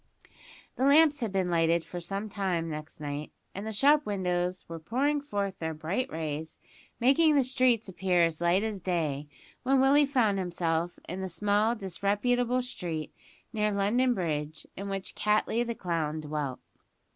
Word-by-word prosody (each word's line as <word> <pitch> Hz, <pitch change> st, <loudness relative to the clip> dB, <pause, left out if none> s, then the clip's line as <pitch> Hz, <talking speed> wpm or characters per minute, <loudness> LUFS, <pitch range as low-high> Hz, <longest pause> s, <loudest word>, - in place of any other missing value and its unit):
The 260 Hz, -, +2 dB
lamps 295 Hz, +1 st, +6 dB
had 230 Hz, -5 st, -2 dB
been 190 Hz, -2 st, 0 dB
lighted 165 Hz, 0 st, +2 dB
for 175 Hz, -, -7 dB
some 195 Hz, +5 st, -4 dB
time 190 Hz, -5 st, -1 dB
next 155 Hz, -1 st, -7 dB
night, 145 Hz, 0 st, -5 dB, 0.2 s
and 200 Hz, +3 st, -5 dB
the -, -, -2 dB
shop 290 Hz, +7 st, +4 dB
windows 180 Hz, -4 st, -1 dB
were 165 Hz, 0 st, -7 dB
pouring 275 Hz, -, 0 dB
forth 200 Hz, -8 st, -3 dB
their 160 Hz, -1 st, -3 dB
bright 180 Hz, +12 st, -2 dB
rays, 155 Hz, 0 st, -4 dB, 0.4 s
making 295 Hz, +5 st, +4 dB
the 275 Hz, -, +5 dB
streets 250 Hz, -3 st, +2 dB
appear 185 Hz, -2 st, +1 dB
as 165 Hz, -1 st, 0 dB
light 175 Hz, +4 st, +3 dB
as 215 Hz, -3 st, -2 dB
day, 155 Hz, -6 st, -1 dB, 0.3 s
when 265 Hz, +1 st, +3 dB
Willie 280 Hz, +2 st, +5 dB
found 225 Hz, -8 st, +2 dB
himself 175 Hz, -2 st, -1 dB
in 185 Hz, +3 st, -4 dB
the 190 Hz, -, -3 dB
small 205 Hz, +6 st, +1 dB
disreputable 230 Hz, +6 st, 0 dB
street 165 Hz, -, -5 dB, 0.4 s
near 210 Hz, -1 st, +1 dB
London 235 Hz, +6 st, +2 dB
Bridge 155 Hz, -4 st, -3 dB
in 200 Hz, +1 st, -5 dB
which 195 Hz, -1 st, -4 dB
Cattley 215 Hz, +2 st, +1 dB
the 235 Hz, -1 st, -4 dB
clown 160 Hz, -5 st, -2 dB
dwelt. 150 Hz, -4 st, -4 dB
195 Hz, 160 wpm, -29 LUFS, 165-240 Hz, 0.4 s, lamps